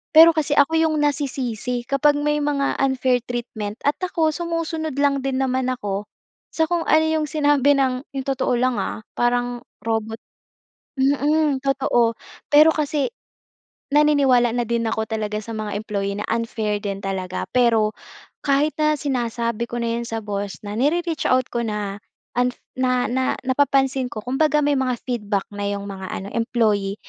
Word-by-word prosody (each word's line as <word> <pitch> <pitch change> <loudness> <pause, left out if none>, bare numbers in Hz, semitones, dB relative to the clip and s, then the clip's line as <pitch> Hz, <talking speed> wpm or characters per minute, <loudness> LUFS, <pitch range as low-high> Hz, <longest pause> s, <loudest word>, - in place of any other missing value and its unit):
Pero 325 +1 +10
kasi 305 -1 0
ako 290 +3 +4
yung 320 -1 +2
nasisisi 255 -4 -1
kapag 290 +1 +3
may 295 0 +1
mga 285 -1 0
unfair 260 -2 +2
treatment 225 -4 -4
at 290 - +2
ako 335 -3 +1
sumusunod 330 -2 -3
lang 280 -1 +3
din 265 -1 0
naman 260 -1 0
ako, 205 -4 -3 0.5
sa 320 - +3
kung 345 -2 0
ano 315 0 +5
'yong 315 -1 0
sinabi 290 -1 +3
ng 260 0 0
'yong 270 0 -4
totoo 265 -2 0
lang, 250 0 +1
ah, - - -3 0.2
parang 245 0 0 0.2
robot 225 0 -2 0.8
mm, 285 +1 +2
totoo. 250 -4 +2 0.4
Pero 305 +2 +8
kasi, 295 -2 0 0.9
naniniwala 280 -5 +4
na 245 - +1
din 235 0 0
ako 220 0 -2
talaga 215 -1 -2
sa 230 - -7
mga 215 -1 -4
employee 200 -2 -3
na 210 - -3
unfair 225 -2 -1
din 195 -1 -3
talaga. 185 -1 -3
Pero, 225 -3 +3 0.5
kahit 285 +2 +2
na 305 0 +3
sinasabi 235 -4 -1
ko 240 - -4
na 230 0 -1
'yon 235 - -4
sa 225 -1 -3
boss, 200 -1 -4
na 205 0 -5
nire-reach 330 +4 0
out 255 0 +3
ko 235 - 0
na 210 -2 -3 0.4
unf 250 0 +2 0.2
na 255 -1 +1
na 260 0 +1
napapansin 270 -1 +2
ko, 215 - -5
kumbaga, 300 +4 +2
may 290 0 +2
mga 255 -1 0
feedback 210 -5 -1
na 205 0 -2
'yong 200 0 -4
mga 190 -1 -7
ano 195 - -5
employee, 215 -4 +1
255 Hz, 160 wpm, -22 LUFS, 225-290 Hz, 0.9 s, Pero